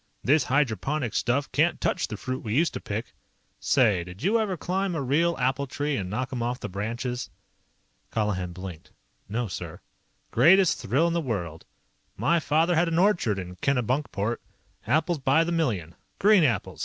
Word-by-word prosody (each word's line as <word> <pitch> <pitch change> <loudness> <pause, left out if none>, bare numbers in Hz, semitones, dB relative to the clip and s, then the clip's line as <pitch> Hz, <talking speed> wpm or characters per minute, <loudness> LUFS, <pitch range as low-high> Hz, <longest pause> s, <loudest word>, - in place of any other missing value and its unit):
"This 145 +1 +3
hydroponic 135 0 0
stuff 135 +2 0
can't - - +2
touch - - 0
the - - -6
fruit 130 0 -4
we 110 -1 -2
used 165 +4 +2
to - - -5
pick. 105 +3 -5 0.5
Say, 105 -10 +3
did 90 +7 -11
you 215 +6 +3
ever 200 -5 -1
climb 185 +2 -1
a 155 - -1
real 165 +6 +2
apple 135 +2 0
tree 145 +2 -2
and 95 -7 -3
knock 130 +7 -3
'em 120 - -3
off 120 +2 -2
the - - -5
branches?" 120 +6 -4 0.8
Colihan 100 -5 -1
blinked. 90 -2 -9 0.4
"No, 115 +3 -1
sir." 90 - -7 0.5
"Greatest 175 +9 +5
thrill 135 +11 +2
in 170 - +1
the 170 - 0
world. 90 - -4 0.5
My 170 0 +2
father 160 +3 +2
had 170 +1 +3
an 165 0 0
orchard 175 - +2
in 90 -1 -7
Kennebunkport. 120 - 0 0.5
Apples 160 +2 +1
by 135 +4 +3
the 170 - -2
million. 110 - -1 0.2
Green 205 -3 +5
apples. 120 -9 0
130 Hz, 170 wpm, -26 LUFS, 105-165 Hz, 0.8 s, Greatest